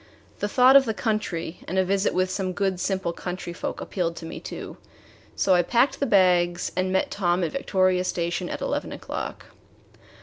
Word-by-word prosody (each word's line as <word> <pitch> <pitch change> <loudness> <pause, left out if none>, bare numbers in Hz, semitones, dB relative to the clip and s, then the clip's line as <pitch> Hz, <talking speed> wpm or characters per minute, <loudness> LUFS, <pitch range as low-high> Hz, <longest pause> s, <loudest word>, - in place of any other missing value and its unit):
The 205 - 0
thought 255 +5 +5
of 275 -1 +8
the 220 -2 -2
country 190 -8 -2
and 185 - -3
a 190 - +3
visit 195 +2 +1
with 185 0 +1
some 185 -1 -2
good 190 -1 -1
simple 190 -2 -1
country 180 0 -5
folk - - -5
appealed 170 -3 -2
to 165 - -8
me 165 - -7
too, - - -8 0.6
so 190 - +3
I 175 - +5
packed 240 +9 +2
the 280 - 0
bags 180 -4 +3
and 185 +1 0
met 190 - +1
Tom 180 -2 +1
at 165 - -1
Victoria 185 -8 +1
Station 175 0 -2
at - - -5
eleven - - -2
o'clock. - - -6
185 Hz, 190 wpm, -25 LUFS, 175-200 Hz, 0.6 s, of